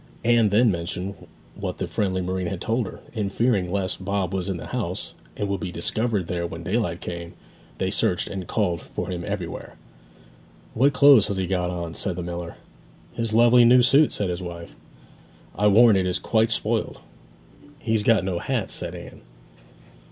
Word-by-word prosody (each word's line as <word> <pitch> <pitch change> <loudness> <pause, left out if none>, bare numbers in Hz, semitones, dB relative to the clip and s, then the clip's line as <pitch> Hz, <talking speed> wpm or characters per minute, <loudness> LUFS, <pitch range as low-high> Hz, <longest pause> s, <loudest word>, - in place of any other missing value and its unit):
Anne 120 -2 +4
then 110 +3 +4
mentioned 90 +2 -4 0.4
what - - -5
the - - -3
friendly 95 -2 -1
marine 90 0 -2
had 90 0 -4
told 115 +2 -1
her; - - -10
and 105 -4 -2
fearing 100 -5 +1
lest 95 -1 -2
Bob 95 -1 -1
was 95 0 -2
in 95 - -2
the - - -8
house, - - -4 0.2
and 105 - -1
would 100 -1 -2
be 90 0 -4
discovered 105 +3 -1
there 85 0 -2
when 85 0 -8
daylight 90 -3 -1
came, 85 -1 -6 0.4
they - - -1
searched - - 0
and 95 -3 -6
called 90 -7 0
for 90 - -6
him 90 -1 -4
everywhere. 90 -4 -5 1.0
'What 140 +5 +3
clothes 140 -7 +7
has 100 -2 -3
he 95 - 0
got 90 -1 -1
on?' 85 -2 -4
said 95 +1 -2
the 90 - -4
miller. 85 0 -6 0.6
'His 115 -1 -2
lovely 120 +2 +6
new 125 +1 +6
suit,' 140 +4 +5
said 100 -3 -1
his 90 +1 -4
wife. 85 -1 -8 0.8
'I 105 - +2
warrant 105 0 +6
it 90 - 0
is 90 0 0
quite 110 +3 +1
spoiled!' 110 0 -1 0.8
'He's 115 -7 0
got 110 -1 +3
no 90 -2 -1
hat,' - - -2
said - - -5
Anne. - - -11
95 Hz, 180 wpm, -24 LUFS, 90-110 Hz, 1.0 s, clothes